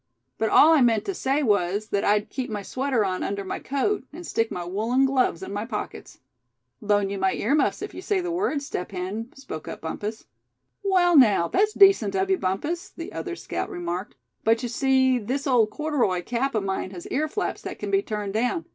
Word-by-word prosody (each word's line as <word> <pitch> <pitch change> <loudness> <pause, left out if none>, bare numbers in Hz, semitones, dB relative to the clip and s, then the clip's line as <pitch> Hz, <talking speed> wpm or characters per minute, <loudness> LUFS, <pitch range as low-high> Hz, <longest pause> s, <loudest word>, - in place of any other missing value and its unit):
But 220 - +1
all 320 +8 +7
I 310 - +5
meant 230 -3 +3
to 395 - -2
say 280 -3 0
was, 205 -1 +1
that 200 - 0
I'd 210 +1 +1
keep 260 -2 -3
my 205 -2 -4
sweater 255 -2 0
on 185 -1 -2
under 200 0 -2
my 190 - -4
coat, 280 +9 -1
and 345 +4 -9
stick 225 -6 0
my 175 -1 -5
woolen 225 +9 +1
gloves 255 -9 +1
in 195 - -6
my 205 +1 -2
pockets." 230 - -6 0.6
"Loan 205 -2 +1
you 200 - -3
my 190 0 +2
earmuffs 285 +8 +1
if - - -6
you - - -7
say 405 -3 0
the 355 -1 -3
word, 340 -5 -1
Step 180 -9 -5
Hen," 195 +6 -4
spoke 160 - -8
up - - -7
Bumpus. 210 +7 -5 0.6
"Well, 365 -3 +3
now, 210 - +6
that's 420 - +2
decent 385 - +5
of 190 0 +1
you, 190 - +2
Bumpus," 300 - -2
the 335 - -8
other 360 -2 -4
scout - - -4
remarked; 175 -2 -4 0.3
"but 225 +2 +2
you 245 - -2
see, 260 +1 +3
this 260 +6 -3
old 240 -5 +3
corduroy 250 - 0
cap 245 +4 -1
of 215 - +1
mine 190 -1 -2
has 180 -2 -9
earflaps 310 +8 -1
that - - -6
can - - -5
be 390 0 +3
turned 210 - -4
down. 245 +9 0
230 Hz, 210 wpm, -25 LUFS, 200-285 Hz, 0.6 s, all